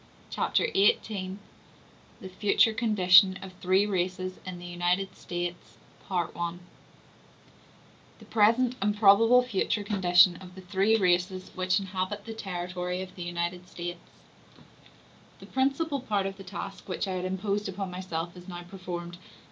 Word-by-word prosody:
Chapter - - +1
XVIII: 195 -1 +1 1.0
Future 210 +2 +4
Condition 190 -4 +5
Of 190 -1 -9
Three 190 +2 +3
Races 185 -1 -2
In 185 -1 -5
The 175 - -10
United 175 +2 -1
States—Part 175 - -5
I 170 0 -3 1.6
The - - -15
Present 235 +4 +3
And 205 +1 +1
Probable 225 +4 +6
Future 210 -2 -1
Condition 180 -3 +4
Of 185 -1 -12
The 190 - -10
Three 195 +4 +2
Races 185 -1 +1
Which 185 +1 +1
Inhabit 195 +1 -4
The 225 - -6
Territory 180 -2 -4
Of 185 -1 -11
The 180 - -10
United 175 +1 -3
States 175 0 -6 1.4
The - - -12
principal 280 +3 0
part 205 -6 -1
of 195 0 -4
the 195 - -10
task 195 +1 -8
which 185 - -2
I 190 - -2
had 185 0 -3
imposed 200 +2 -2
upon 195 0 -5
myself 175 -2 -5
is 180 0 -12
now 175 -1 -7
performed. 175 -1 -7
185 Hz, 140 wpm, -28 LUFS, 180-205 Hz, 1.6 s, Probable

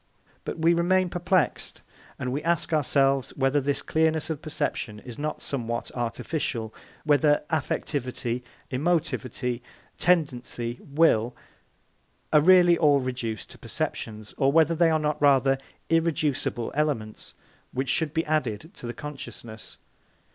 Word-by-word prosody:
But - - -4
we 165 +1 +4
remain 180 +2 +2
perplexed, 180 0 0 0.3
and 125 -1 -3
we 140 +3 -2
ask 170 -1 0
ourselves 135 -2 +2
whether 135 +1 +2
this 140 +1 -1
clearness 160 0 +1
of 155 -2 -4
perception 115 -8 -3
is 120 -1 -10
not 155 +1 -3
somewhat 120 -3 -3
artificial, 120 -1 -3 0.3
whether 150 0 +3
affectivity, 125 -5 -2 0.3
emotivity, 130 -5 -1 0.4
tendency, 125 -8 0
will, 140 -6 +2 1.0
are 150 - +7
really 175 0 +6
all 145 -3 +5
reduced 125 -4 -4
to - - -13
perceptions, 110 -1 -4
or 135 0 +4
whether 160 +2 +4
they 165 0 +4
are 160 - +3
not 150 -1 -1
rather 135 -1 +4 0.3
irreducible 155 -7 0
elements 135 -8 -2 0.4
which 130 0 -2
should 155 +2 +2
be 160 +1 -1
added 155 - -1
to 120 - -7
the 120 - -5
consciousness. 120 -6 -8
145 Hz, 125 wpm, -26 LUFS, 125-160 Hz, 1.0 s, are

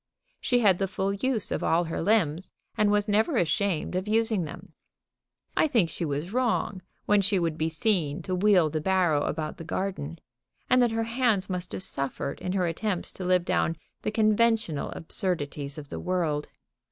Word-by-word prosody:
She 245 -1 +2
had 195 -5 +4
the 195 - +1
full 195 +1 -1
use 225 +2 -1
of - - -1
all 165 +2 +3
her 165 - -3
limbs, 180 -3 +1 0.3
and 210 -1 +3
was 205 0 +2
never 220 +7 +2
ashamed 175 0 0
of 185 +2 -2
using 220 -4 +1
them. 175 +3 -10 0.8
I - - +4
think 225 - +2
she 170 - -3
was 150 +6 -3
wrong 235 -6 0 0.2
when 205 -1 +4
she 200 +1 +1
would 165 -3 0
be 160 0 -1
seen 160 -4 0
to 185 - -3
wheel 180 -4 +4
the 155 - -2
barrow 175 -4 +2
about 155 0 -3
the - - -7
garden, 170 -3 -3 0.5
and 255 - +4
that 240 - +4
her 225 0 -1
hands 230 -5 +1
must 180 -1 -3
have - - 0
suffered 140 -3 -3
in 180 - -2
her 185 -2 +1
attempts 175 +2 -1
to 185 - -8
live 180 -1 +2
down 165 -2 +1 0.2
the - - -1
conventional 215 -6 +2
absurdities 145 -5 -3
of 145 -2 -8
the - - -5
world. 165 -5 -1
185 Hz, 185 wpm, -27 LUFS, 160-215 Hz, 0.8 s, had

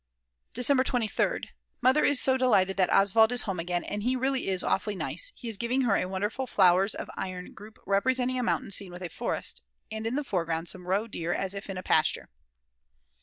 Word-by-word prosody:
December 260 +2 +3
23rd. 240 -5 -1 0.3
Mother 260 +4 +3
is 285 -3 +5
so 260 - +5
delighted 195 -8 +2
that 185 -2 +2
Oswald 220 +4 +5
is 245 0 +2
home 195 -5 -3
again 175 +1 -2
and 210 - -4
he 250 +4 0
really 265 +1 -1
is 190 -2 -1
awfully 205 +2 0
nice; - - -2
he 240 - -9
is 225 -3 -4
giving 240 +4 0
her 230 -6 +2
a - - 0
wonderful 205 +7 -3
flowers 190 0 +3
of - - -6
iron 185 -1 -6
group 215 +1 -13
representing 255 +5 +1
a - - 0
mountain 240 - -1
scene 195 -1 -1
with 175 +1 -9
a 175 - -4
forest, - - -3 0.3
and 220 +1 -4
in 235 - -2
the 295 - -1
foreground 165 -6 -2
some 180 0 -4
roe 195 +4 +1
deer 175 -6 -3
as 195 0 -2
if 200 0 -8
in 190 - -4
a 185 - -6
pasture. 155 -3 +1
205 Hz, 210 wpm, -28 LUFS, 185-250 Hz, 0.3 s, is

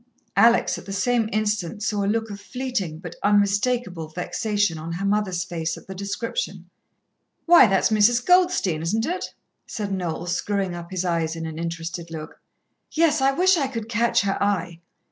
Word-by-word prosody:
Alex 230 +4 +4
at - - -13
the - - -5
same 225 +3 +1
instant 210 -2 -1
saw 210 -2 0
a - - 0
look 225 0 -1
of 200 0 -8
fleeting, 240 -9 -3
but 175 0 -8
unmistakable 205 -3 +1
vexation 180 +2 -1
on 165 +2 -5
her 185 +4 -3
mother's 200 -3 0
face 170 -3 -3
at - - -13
the 190 - -7
description. 200 - -4 0.8
"Why, 340 -7 +8
that's 195 -1 +2
Mrs. 235 +3 +4
Goldstein, 360 - +3
isn't 215 +8 0
it?" 360 +3 -4 0.3
said 205 -3 -4
Noel, 175 -3 -3
screwing 185 +1 -1
up 170 0 -7
his 185 -1 -2
eyes 165 -2 0
in 165 0 -5
an 160 0 -6
interested 165 0 -5
look. 160 -1 -8 0.5
"Yes. 310 -3 +2
I 270 +1 +4
wish 370 +5 +4
I 280 -4 +1
could 230 -4 -5
catch 235 0 +2
her 195 -1 -1
eye." 180 -4 -1
200 Hz, 175 wpm, -24 LUFS, 175-230 Hz, 0.8 s, Why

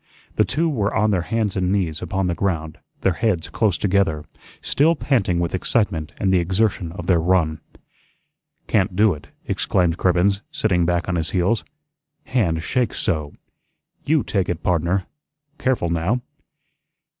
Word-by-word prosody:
The - - +4
two 160 +5 0
were 110 -9 0
on 105 0 +3
their 95 -3 +1
hands 110 +1 -1
and 90 -1 0
knees 90 -6 -1
upon 95 +2 -1
the 90 - 0
ground, 80 -4 -2 0.2
their 95 - +2
heads 95 -4 -1
close 105 -7 +1
together, 95 -6 +1 0.3
still 160 +4 +2
panting 115 - +1
with 85 -1 -1
excitement 90 -5 0
and 95 -1 +1
the 90 - +5
exertion 95 0 0
of 85 -2 -7
their 85 -2 +3
run. 80 -2 +1 1.1
"Can't 95 -3 +1
do 105 0 +4
it," 75 - -11 0.2
exclaimed 85 -2 0
Cribbens, 95 +2 +2
sitting 90 -6 +1
back 85 -1 0
on 90 -1 0
his 80 -1 -1
heels, 95 +6 +1 0.6
"hand 85 -11 0
shakes 125 +1 0
so. 75 -5 -1 0.7
YOU 155 -1 +2
take 95 -3 -1
it, 85 -1 -3
pardner. 90 +2 +1 0.5
Careful, 125 -10 0
now." 90 +9 0
90 Hz, 155 wpm, -22 LUFS, 85-105 Hz, 1.1 s, the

